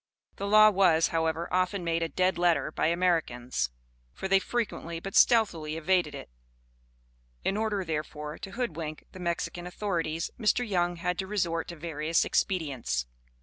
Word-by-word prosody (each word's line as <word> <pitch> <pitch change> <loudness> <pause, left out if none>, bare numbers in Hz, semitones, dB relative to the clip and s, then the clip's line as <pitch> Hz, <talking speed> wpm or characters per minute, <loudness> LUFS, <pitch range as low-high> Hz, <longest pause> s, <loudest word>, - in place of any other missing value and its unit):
This 200 - -4
law 215 +1 +7
was, 180 -5 +4
however, 160 +1 0
often 185 +1 +1
made 165 0 0
a 165 - -1
dead 185 -1 +1
letter 175 -3 +2
by - - 0
Americans; 160 - 0 0.4
for, 190 - -4
they 195 0 +5
frequently, 190 -6 -3
but 195 +3 -7
stealthily 165 -10 +3
evaded 180 +2 +1
it. - - -9 1.1
In 195 - 0
order, 210 -3 -1
therefore, 150 -1 -4
to 195 - -7
hoodwink 165 -10 -4
the 185 - -11
Mexican 175 0 -3
authorities, 170 -4 -2
Mr. 235 +2 +2
Young 175 -3 +1
had 175 +1 -2
to 190 - -2
resort 170 -5 -1
to 170 - -7
various 160 0 0
expedients. 135 - -1
170 Hz, 150 wpm, -28 LUFS, 160-190 Hz, 1.1 s, law